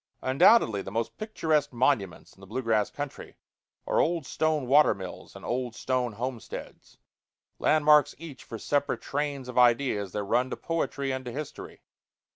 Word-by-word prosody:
Undoubtedly 130 - +5
the 95 - -7
most 115 +3 -3
picturesque 160 -9 0
monuments 115 - 0
in - - -23
the 95 - -12
blue 125 +6 -4
grass 110 -3 +2
country 145 -1 -7 0.5
are - - +1
old 165 -3 +1
stone 155 -2 0
water 145 +4 +5
mills 95 -2 -9
and - - -10
old 120 -2 -2
stone 125 -2 -1
homesteads 120 +1 -7 0.6
landmarks 150 -2 +4
each 155 -5 -10
for 115 - -7
separate 145 +5 -1
trains 140 -2 -3
of 125 0 -1
ideas 120 -5 +3
that 105 +1 -3
run 125 +6 +1
to - - -5
poetry 140 -4 -2
and 130 0 -3
to 120 - -5
history. 150 +3 -8
130 Hz, 160 wpm, -28 LUFS, 115-145 Hz, 0.6 s, Undoubtedly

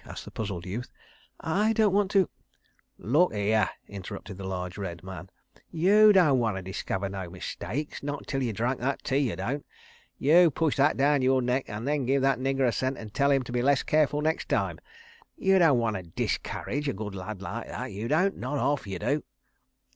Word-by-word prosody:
asked - - -9
the - - -10
puzzled 100 -5 -4
youth. 110 +7 -5 0.5
"I 210 +7 +1
don't 215 -3 +3
want 200 -1 +2
to.. 195 -3 +3 0.4
." - - -42
"Lookere," 110 - +2 0.2
interrupted 100 0 -8
the 95 - -5
large 90 -1 -4
red 90 -5 -6
man, 95 0 -8 0.4
"you 205 +6 +6
don' 165 -10 +5
wanter 105 -5 -1
discover 95 +1 -3
no 95 -2 -5
mistakes, 105 - -5
not 145 0 -4
until 135 -1 -3
you 120 -3 0
drunk 120 +5 -1
that 135 +3 -2
tea, 135 - +1
you 100 - -3
don't.... 120 +11 -3 0.5
You 170 +5 +6
push 160 0 0
that 140 +2 +3
daown 140 0 +3
yore 130 0 +3
neck 125 +2 0
and 110 +4 -5
then 145 -4 0
give 135 0 +2
that 135 -2 +2
nigger 135 0 +1
a - - +2
cent 130 +5 -1
an' 110 -2 -9
tell 140 +6 +2
'im 135 -2 +3
to 125 - -8
be 120 0 0
less 140 +1 +3
careful 150 -1 +2
nex' 160 +2 0
time. - - -1 0.6
You 190 -1 +3
don' 160 -7 +5
wanter 110 -5 0
_dis_courage 125 - -3
a - - 0
good 105 0 -6
lad 95 +1 -6
like - - -5
that, - - -5
you 105 +4 -4
don't. 180 +8 +2
Not 130 +4 -3
'arf, 140 -5 0
you 95 -2 -4
do." 140 - -1
130 Hz, 200 wpm, -27 LUFS, 100-150 Hz, 0.6 s, you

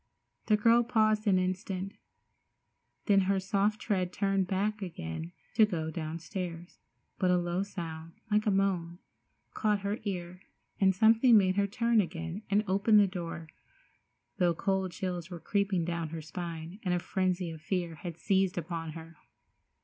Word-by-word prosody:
The 215 - +4
girl 230 +3 +5
paused 215 -2 +2
an 190 -2 +5
instant, 185 +1 -2 1.1
then 200 -1 +5
her 195 -1 +3
soft 200 +2 +1
tread 185 -4 -1
turned 195 -1 0
back 210 +3 -1
again 80 - -5 0.2
to 220 - +5
go 165 -6 0
downstairs, 170 +2 -5 0.4
but 185 - +2
a 180 - +4
low 175 +1 -1
sound, 165 -4 -6 0.2
like 210 +1 +2
a - - +5
moan, 190 -4 0 0.6
caught 210 -2 +1
her 200 +2 -2
ear, 180 -3 -5 0.4
and 190 -1 +4
something 225 +3 +6
made 185 -2 +3
her 200 0 +2
turn 230 +1 +2
again 170 +1 -5
and 205 +1 +3
open 200 +3 +4
the 205 - +7
door, 170 -3 -5 0.9
though 175 -2 +3
cold 190 +1 0
chills 180 -2 -4
were 175 -2 -7
creeping 200 -2 0
down 170 -2 -2
her 165 0 -5
spine, 170 +2 -6
and 180 -2 0
a - - 0
frenzy 185 -1 -1
of 160 -1 -9
fear 175 0 -2
had 165 +1 -7
seized 190 +1 +1
upon 165 -1 -4
her. 165 0 -10
185 Hz, 155 wpm, -30 LUFS, 170-200 Hz, 1.1 s, the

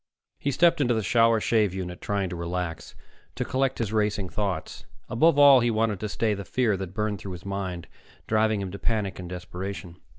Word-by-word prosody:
He 140 - -1
stepped 165 +3 +3
into 120 -3 +2
the 110 - -1
shower 115 +3 +4
shave 105 -4 +1
unit, 90 -2 -5
trying 100 -2 -1
to 90 - -5
relax, 85 0 -4 0.4
to - - -2
collect 135 0 0
his 110 -2 -2
racing 105 -3 0
thoughts. 100 -1 -3 0.3
Above 155 +6 +3
all, 140 -2 +8
he 120 0 +2
tried 110 -3 0
to 105 - -4
stay 110 +1 0
the 100 0 -5
fear 110 +2 +1
that 95 -1 -6
burned 105 -2 -1
through 95 -1 -7
his 90 - -10
mind, 95 -3 -4 0.4
driving 110 -1 +1
him 95 -2 -4
to 100 - -7
panic 105 -5 -1
and 90 -1 -7
desperation. 90 0 -6
105 Hz, 200 wpm, -26 LUFS, 95-115 Hz, 0.4 s, all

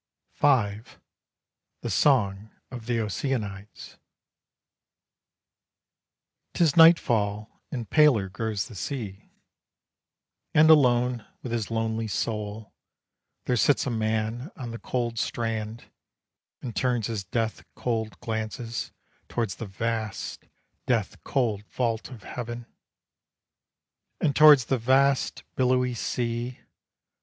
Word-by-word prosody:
V. 110 -8 +2 1.0
THE - - -2
SONG 105 -7 +2 0.2
OF 120 -3 -8
THE 120 -2 +1
OCEANIDES. 105 -2 -4 2.6
'Tis 165 -5 +3
nightfall 110 -11 +4
and 120 -5 -4
paler 145 -11 +4
grows 105 -1 -3
the - - -12
sea. 105 -2 -5 1.3
And 155 +1 +7
alone 125 -5 +4 0.2
with 125 - -5
his 115 -3 -2
lonely 115 0 -1
soul, 105 0 -3 0.7
There 125 - +1
sits 135 +4 +3
a 130 - -1
man 110 +4 -1
on 125 -8 -6
the 115 - -7
cold 120 -2 -2
strand 115 -1 -3 0.7
And 120 -3 -5
turns 125 -4 +1
his 110 -3 -3
death 110 +3 -2
cold 110 -3 -2
glances 115 0 -4 0.4
Towards 115 -5 -1
the 115 - -6
vast, 110 +1 -4 0.4
death - - -1
cold 110 -6 0
vault 115 -3 -2
of 120 -6 -11
heaven, 120 -1 -6 1.5
And 145 -3 +1
toward 150 -1 +9
the 125 +2 -1
vast, 135 +3 +2
billowy 125 -1 +2
sea. 120 +1 -3
115 Hz, 105 wpm, -26 LUFS, 110-125 Hz, 2.6 s, toward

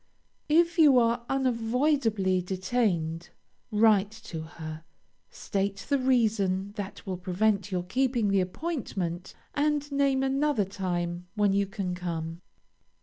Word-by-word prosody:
If 335 +2 +3
you 290 -5 +7
are 235 0 +2
unavoidably 235 -6 +1
detained, 180 -3 -1 0.4
write 210 -2 +4
to 165 -7 -6
her, 160 0 -8 0.5
state 195 0 -3
the 280 -1 +3
reason 210 -7 +1
that 205 -1 -7
will 185 -2 -3
prevent 195 +2 0
your 180 -1 -1
keeping 240 +2 +1
the 195 -1 +3
appointment, 185 - -4 0.2
and 290 0 0
name 275 -1 +2
another 270 -4 +1
time 175 -2 -3
when 205 -2 +3
you 200 0 +1
can 195 -3 -3
come. 170 -2 -4
205 Hz, 120 wpm, -28 LUFS, 180-255 Hz, 0.5 s, you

